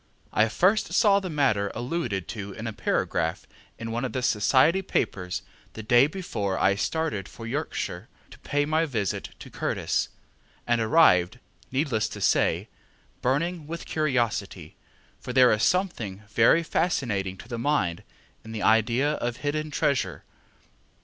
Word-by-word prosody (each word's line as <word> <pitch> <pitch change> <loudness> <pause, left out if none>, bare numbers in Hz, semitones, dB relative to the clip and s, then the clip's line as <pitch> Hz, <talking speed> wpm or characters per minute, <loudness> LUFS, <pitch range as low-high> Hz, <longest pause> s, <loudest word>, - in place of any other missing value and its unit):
I 110 +1 +3
first 195 - +2
saw 205 -3 +5
the 190 -2 -5
matter 130 - +1
alluded 120 - -3
to 100 -3 -6
in 110 - -7
a 110 - -3
paragraph - - -1 0.3
in 115 0 -5
one 120 +2 -2
of 130 - -3
the 130 -2 -2
society 130 - +3
papers 90 - -2 0.3
the 110 - -7
day 120 +4 +5
before 105 - -3
I 100 - +3
started 130 - -2
for 115 - -10
Yorkshire 140 +7 -4 0.2
to - - -14
pay 145 0 0
my 160 +2 +1
visit 110 - -2
to - - -12
Curtis, - - -1 0.6
and 120 -1 +1
arrived, 110 - +4 0.3
needless 130 -5 0
to - - -8
say, - - +2 0.5
burning 155 +5 -1
with 170 +1 -6
curiosity; 115 - -1 0.4
for 125 - -6
there 130 -1 +6
is 105 - +1
something 115 - 0
very 115 +10 +4
fascinating 110 - -1
to 115 - -12
the 120 -1 -5
mind 115 - 0 0.4
in 110 0 -9
the 110 - -4
idea 115 +6 +3
of 120 0 -3
hidden 155 +1 -2
treasure. 130 - -1
120 Hz, 150 wpm, -26 LUFS, 105-155 Hz, 0.6 s, there